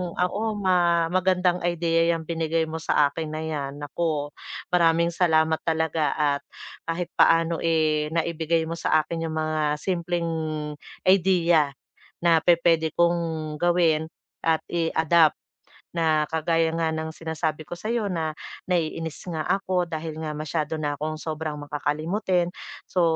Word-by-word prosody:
oo, 180 +4 0
ma 175 -3 +3
magandang 180 -1 +2
idea 170 -1 +1
'yang 165 -1 -4
binigay 165 0 0
mo 160 +1 -6
sa 145 -2 +3
akin 160 0 -4
na 155 +1 -4
'yan. 145 -3 -4
Naku, 145 0 -2 0.4
maraming 170 0 +3
salamat 160 -2 +2
talaga 160 -2 0
at 145 -2 +1 0.5
kahit 170 +1 -2
paano, 165 0 +3
eh, 155 -2 +1
naibigay 165 0 0
mo 165 - -4
sa 155 -1 +2
akin 165 -1 -3
'yong 160 - -4
mga 155 0 0 0.2
simpleng 170 0 -2 0.8
idea 175 -5 +4 0.6
na 165 -2 +5
pupuwede 165 -2 +3
kong 165 -3 0
gawin 165 -3 +2 0.3
at 160 -1 +2
i-adapt. 165 -1 +3 0.6
Na 160 -3 +1
kagaya 165 0 +1
nga 165 -1 0
ng 160 0 -3
sinasabi 160 -1 -3
ko - - -7
sa'yo 215 +4 -2
na 160 -2 -2 0.3
naiinis 165 -2 -2
nga 165 -4 -3
ako 185 -3 0
dahil 160 -1 -5
nga 150 -1 -4
masyado 155 0 -2
na 150 -1 -1
akong 155 +2 -4
sobrang 155 -1 -4
makakalimutin. 165 +6 -1 0.3
So 180 - 0
165 Hz, 135 wpm, -25 LUFS, 155-170 Hz, 0.8 s, na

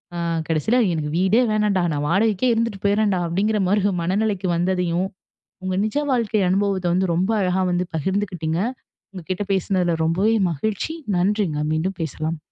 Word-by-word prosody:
அ, - - -4 0.3
கடைசியில 170 - +2
எனக்கு 150 -2 -2
வீடே 190 +6 +3
வேணாண்டா. 210 -3 +1
நான் 145 0 -2
வாடகைக்கே 220 +5 +2
இருந்துட்டு 225 -4 -2
போயிறேன்டா. 205 -2 +2
அப்படிங்கிற 205 +5 0
மாரி, 200 +1 +2 0.2
மனநிலைக்கு 195 +1 0
வந்ததையும், 180 0 0 0.6
உங்க 185 0 -1
நிஜ 215 - -5 0.2
வாழ்க்கை 225 -4 +1
அனுபவத்தை 195 -1 +1
வந்து, 185 -1 +1
ரொம்ப 185 +5 +1
அழகா 185 0 +1
வந்து, 180 +1 0
பகிர்ந்துக்கிட்டிங்க. 175 -1 -1 0.5
உங்க 185 -2 -8
கிட்ட 185 +2 -1
பேசினதில 185 -2 +1
ரொம்பவே 190 +7 +2 0.2
மகிழ்ச்சி. 210 - -2 0.2
நன்றிங்க. 185 -3 +1
மீண்டும் 175 +5 -1
பேசலாம். 160 +1 -3
190 Hz, 145 wpm, -22 LUFS, 175-210 Hz, 0.6 s, வீடே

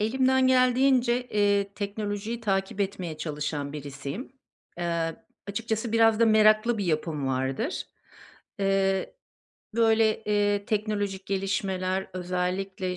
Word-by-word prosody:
Elimden 260 +4 +3
geldiğince, 255 -1 +3
eee, 200 -1 +1
teknolojiyi 205 +2 -4
takip 195 -2 -1
etmeye 185 -5 -3
çalışan 150 -2 -3
birisiyim. 145 - -6 0.5
Eee, 170 -1 -1 0.3
açıkçası, 220 +2 -2
biraz 225 -1 +4
da 230 - +6
meraklı 215 +1 +4
bir 200 - -1
yapım 155 -4 -1
vardır. 130 - -2 0.8
Eee, 195 - +1 0.6
böyle, 225 -1 +3
eee, 205 -1 +1
teknolojik 205 -3 -2
gelişmeler, 190 -1 -1
özellikle 180 +1 -2
200 Hz, 100 wpm, -27 LUFS, 180-225 Hz, 0.8 s, da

